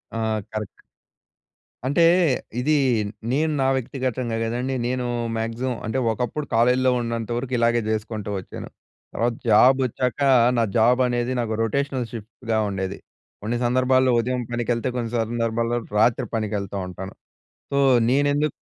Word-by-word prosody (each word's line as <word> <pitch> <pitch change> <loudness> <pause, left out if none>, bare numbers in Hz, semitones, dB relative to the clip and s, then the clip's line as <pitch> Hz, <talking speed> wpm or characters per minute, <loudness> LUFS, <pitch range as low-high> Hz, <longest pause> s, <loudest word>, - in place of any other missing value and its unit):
ఆ! - - -2 0.3
కరెక్ట్. 110 -2 -6 1.0
అంటే 145 +5 +3 0.6
ఇదీ 150 +5 +2 0.6
నేను 155 +3 +1
నా 130 - +2
వ్యక్తిగ‌తంగా 130 -2 -2
గదండి. 125 +4 -2
నేనూ 125 0 -1 0.3
మాగ్సిమం 115 +3 -2
అంటే 110 +4 -1
ఒకప్పుడు 125 +6 -3
కాలేజ్‌లో 125 +2 +3
ఉన్నంత 115 -1 -3
వరకు 130 +1 -4
ఇలాగే 115 0 +2
జే‌సుకుంటూ 110 -1 -3
వచ్చాను. 90 - -9 0.4
తర్వాత 120 +1 0 0.2
జాబ్ 125 +5 +6
ఒచ్చాకా 125 +4 -1 0.3
నా 115 - +3
జాబ్ 125 +3 +4
అనేది 120 +1 -1
నాకు 115 -2 -1
రొటేషనల్ 130 +1 -1
షిఫ్ట్‌గా 115 0 -4
ఉండేది. 95 0 -3 0.4
కొన్ని 115 +4 -2
సందర్భాల్లో 130 +1 +3
ఉదయం 125 +2 -1
పనికెళ్తే 120 +1 -1
కొన్ని 115 -2 -3
సందర్భాల్లో 115 +1 -1 0.2
రాత్రి 115 +1 +3
పనికెళ్తా 105 -2 -2
ఉంటాను. 95 +1 -8 0.6
సో 140 - 0 0.3
నేనెందు 145 +2 +2
120 Hz, 125 wpm, -23 LUFS, 110-130 Hz, 1.0 s, జాబ్